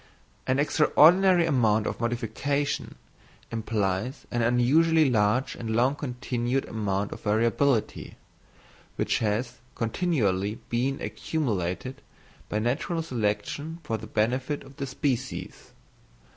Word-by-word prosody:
An 130 - +2
extraordinary 170 +5 +5
amount 110 -8 +2
of - - -3
modification 120 +5 -2 0.6
implies 110 +1 -2
an 120 - 0
unusually 145 +7 +4
large 110 +3 +2
and 110 -1 -4
long 125 +4 +3
continued 125 -2 -2
amount 100 -2 -2
of - - -8
variability, 115 +3 +1 0.8
which - - 0
has 115 +3 -1 0.2
continually 110 - 0
been 130 +4 0
accumulated 125 - -3 0.5
by 105 - -1
natural 140 +9 -1
selection 130 +5 -2
for 110 -1 -2
the 110 - -9
benefit 130 +7 -1
of 135 0 -15
the 140 -2 -3
species. 130 -1 -3
125 Hz, 105 wpm, -27 LUFS, 110-140 Hz, 0.8 s, extraordinary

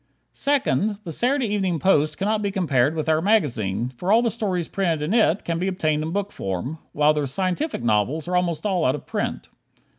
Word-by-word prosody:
Second: 215 - +1
The 170 - -6
Saturday 255 - +1
Evening 190 -4 0
Post 155 -4 +2
cannot 210 +2 0
be 200 - 0
compared 150 -7 +1
with 155 -1 -2
our 155 0 +2
magazine, 120 - +1
for 175 +10 -3
all 230 +2 +5
the 230 - +1
stories 190 -7 -2
printed 170 -6 -1
in 160 +7 -1
it 215 -5 +2
can 165 -1 -1
be 185 - -1
obtained 155 -5 0
in 155 - -3
book 200 +2 -2
form, 100 - -4
while 150 +1 +3
the 150 -2 -1
scientific 185 - -2
novels 120 +9 +1
are 180 - -1
almost 170 -2 0
all 185 -5 +1
out 130 - +2
of - - -9
print. - - -3
170 Hz, 205 wpm, -23 LUFS, 150-200 Hz, -, all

